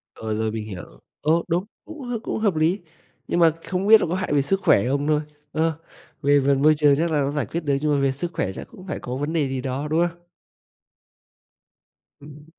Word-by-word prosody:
Ờ, 110 -1 -4
rồi 110 0 -1
mình 110 -1 -4
hiểu, 95 -5 -7 0.4
ồ, 165 +2 +2
đúng, 175 +2 0 0.2
cũng 320 -2 -10
h - - -2
cũng - - -3
hợp 205 -5 +1
lý, 160 +5 +2 0.5
nhưng 175 - 0
mà 165 -1 +6
không 190 +1 -2
biết 220 0 +8
là - - 0
có 175 - 0
hại 190 -5 -2
về 145 - +4
sức 190 +8 0
khỏe 100 +4 +4
không 140 +2 0
thôi. 150 -1 +2 0.3
Ơ, 160 +1 +1 0.5
về 145 0 +4
phần 140 -1 +3
môi 155 +1 +6
trường 145 -2 +4
chắc 165 +1 0
là 150 - +2
nó 140 0 0
giải 145 -3 -1
quyết 170 +10 -4
được 145 -2 +1
nhưng 150 0 +1
mà 140 - +1
về 135 -1 +2
sức 170 +6 -4
khỏe 95 - -1
chắc - - -8
cũng 190 -5 -13
phải 155 - -4
có 125 0 -5
vấn 145 +4 -3
đề 155 -4 +1
gì 130 -1 -3
đó, 135 +3 -3
đúng 165 +3 +2
không? 170 0 -11 2.0
Ừm. 150 +1 -13
150 Hz, 240 wpm, -23 LUFS, 140-170 Hz, 2.0 s, biết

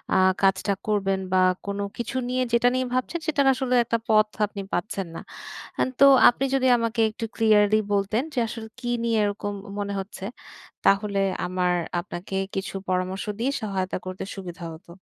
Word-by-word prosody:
আ - - +5 0.3
কাজটা 195 +1 +3
করবেন? 195 -2 +1
বা, 185 - +5 0.2
কোন 200 0 -3 0.2
কিছু 240 +2 -3
নিয়ে, 255 +1 0
যেটা 240 +1 +4
নিয়ে 255 0 0
ভাবছেন, 255 +7 -1
সেটার 285 -3 +2
আসলে 255 -1 0
একটা 230 - +1
পথ 215 -1 +5 0.2
আপনি 200 -1 -7
পাচ্ছেন 195 -3 -2
না। - - -6 0.6
আন - - +2
তো - - +9 0.2
আপনি 245 +3 +1
যদি 265 -1 +2
আমাকে 230 0 -1
একটু 225 +1 -6
ক্লিয়ারলি 215 -1 +4 0.2
বলতেন 200 +4 +1
যে, - - -2
আসলে 220 -1 -7
কী 240 -1 -3
নিয়ে 230 -1 +2
এরকম 205 0 -2 0.2
উম - - -8
মনে 200 0 -3
হচ্ছে? 195 0 -8 0.6
তাহলে 200 0 +3 0.3
আমার 180 0 0 0.3
আপনাকে 180 +1 -7 0.2
কিছু 195 0 -4
পরামর্শ 185 +1 -1
দিয়ে 245 +4 +1
সহায়তা 190 -3 -2
করতে 185 0 -5
সুবিধা 175 -2 -7
হতো। 170 +2 -15
205 Hz, 170 wpm, -25 LUFS, 190-235 Hz, 0.6 s, তো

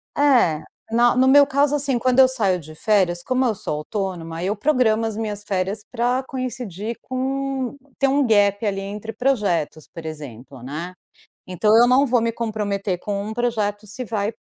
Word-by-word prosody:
É, 240 - +3 0.3
na 240 +1 +4
no 260 +1 +4
meu 285 +1 +7
caso, 285 +1 +2
assim, 275 -4 0
quando 255 +1 +2
eu 260 - +8
saio 200 -8 0
de 155 0 -12
férias, 185 -3 +1
como 255 0 +1
eu 230 - +2
sou 150 - -4
autônoma, 170 -2 -4
eu 200 +3 0
programo 230 -3 +2
as 220 -2 -3
minhas 210 -2 -4
férias 195 +2 -2
pra 250 +2 0
coincidir 235 -5 -5
com, 265 0 -3 0.2
ter 275 - +3
um 280 +1 +2
gap 205 -1 +3
ali 195 -1 -1
entre 210 +3 -6
projetos, 205 - -1
por 165 -1 -10
exemplo, 135 -4 -9
né. 155 +7 -6 0.5
Então 210 +4 +2
eu 240 +1 +6
não 265 +3 +4
vou 245 -2 +2
me 230 0 0
comprometer 205 -5 -2
com 200 0 -3
um 220 - -5
projeto 215 -3 -1
se 250 +5 -6
vai 210 0 -2
215 Hz, 180 wpm, -22 LUFS, 195-255 Hz, 0.5 s, eu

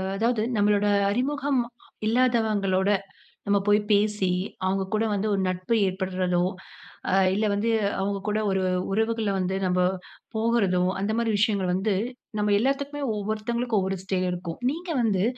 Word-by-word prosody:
அதாவது 225 +2 +1 0.2
நம்மளோட 205 0 +3 0.2
அறிமுகம் 275 +3 0 0.5
இல்லாதவங்களோட 215 -5 +2 0.6
நம்ம 200 0 +3
போயி 205 +1 +5
பேசி, 205 -2 +2 0.3
அவுங்க 190 +1 +1
கூட 215 +1 +2
வந்து 205 +2 -1
ஒரு 195 - 0
நட்பு 185 +4 -1
ஏற்படறதோ, 185 -1 0 0.7
அ - - -1 0.2
இல்ல 215 +2 +1
வந்து 215 +3 0 0.3
அவுங்க 200 +1 -1
கூட 210 +1 +1
ஒரு 190 -1 +1 0.3
உறவுகள 225 +1 0
வந்து 185 +1 -1
நம்ம 180 0 +1 0.6
போகுறதோ, 220 -5 +2 0.2
அந்த 200 +2 0
மாரி 230 -1 +1
விஷயங்கள் 200 -3 +1
வந்து 195 +2 0 0.5
நம்ம 210 0 +2
எல்லாத்துக்குமே 280 +4 -1
ஒவ்வொருத்தவங்களுக்கு 215 +3 -1
ஒவ்வொரு 190 0 -2
ஸ்டைல் 185 -1 0
இருக்கும். 175 -2 -6
நீங்க 345 +3 -7
வந்து 200 -4 +2
205 Hz, 135 wpm, -25 LUFS, 190-230 Hz, 0.7 s, போயி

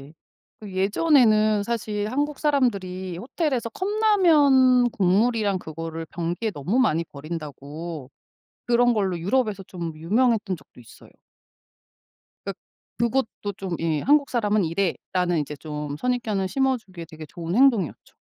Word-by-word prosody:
네네. 140 +3 -13 0.5
그 205 -3 -9
예전에는 215 - +3
사실 210 -2 -2
"한국 290 +3 -2
사람들이 195 - 0
호텔에서 260 - -2
컵라면 300 - +4
국물이랑 205 +1 +2
그거를 165 0 -6
변기에 175 +7 -3
너무 180 - -2
많이 165 -9 +2
버린다."고 150 -1 -7 0.6
그런 245 0 +4
걸로 195 -6 0
유럽에서 210 +2 0
좀 175 -3 -6
유명했던 210 +3 +1
적도 135 - -19
있어요. 115 - -16 1.3
그러니까 - - -5 0.4
그것도 235 -3 -1
좀 185 -3 -4
예 160 -3 0
"한국 285 0 +3
사람은 215 -4 +1
이래."라는 175 0 -1
이제 150 0 -5
좀 150 -1 -5
선입견을 220 -3 -1
심어주기에 220 -9 -2
되게 155 -1 -10
좋은 170 -1 -5
행동이었죠. 235 - +2
200 Hz, 320 characters per minute, -24 LUFS, 170-245 Hz, 1.3 s, 컵라면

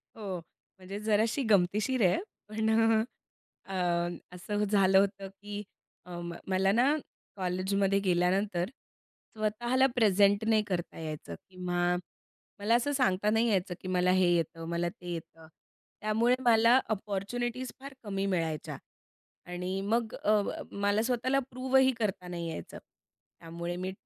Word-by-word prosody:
हो. 190 -6 -5 0.4
म्हणजे 190 +2 -7
जराशी 220 +5 +1
गमतीशीर 210 +6 +2
आहे - - +2 0.3
पण 220 +1 0
अ, 225 0 +4 0.7
अ, - - -3 0.6
असं 205 +3 -2
झालं 195 -2 +4
होतं 195 0 0
की 205 0 -6 0.4
अ, 175 -1 -7 0.3
मला 190 +1 +2
ना 255 +7 +4 0.4
कॉलेजमध्ये 190 +1 +1
गेल्यानंतर 180 0 +1 0.7
स्वतःला 240 +5 +2
प्रेझेंट 205 -2 +4
नाही 220 -1 +4
करता 175 -3 -3
यायचं 155 - -6
किंवा 180 -1 0 0.6
मला 215 +3 +3
असं 245 +4 +1
सांगता 210 -6 +2
नाही 225 +2 +3
यायचं, 185 -3 0
की - - -7
मला 180 0 +2
हे 185 -1 +4
येतं 165 0 -2
मला 170 0 0
ते 175 -2 -7
येतं. 165 -1 -9 0.5
त्यामुळे 225 +4 +3
मला 235 +2 +6
अपॉर्च्युनिटीज 225 +5 -3
फार 275 0 -9
कमी 195 -2 -2
मिळायच्या 165 -6 -2 0.7
आणि 180 +2 -3
मग 220 +3 0
अ, 210 0 +2
ब - - -3 0.2
मला 205 +1 +2
स्वतःला 255 +2 +1
प्रूवही 260 +1 +3
करता 195 -4 -2
नाही 170 -1 -4
यायचं. 85 - -7 0.6
त्यामुळे 170 +1 -5
मी 185 +1 -3
200 Hz, 130 wpm, -30 LUFS, 180-220 Hz, 0.7 s, मला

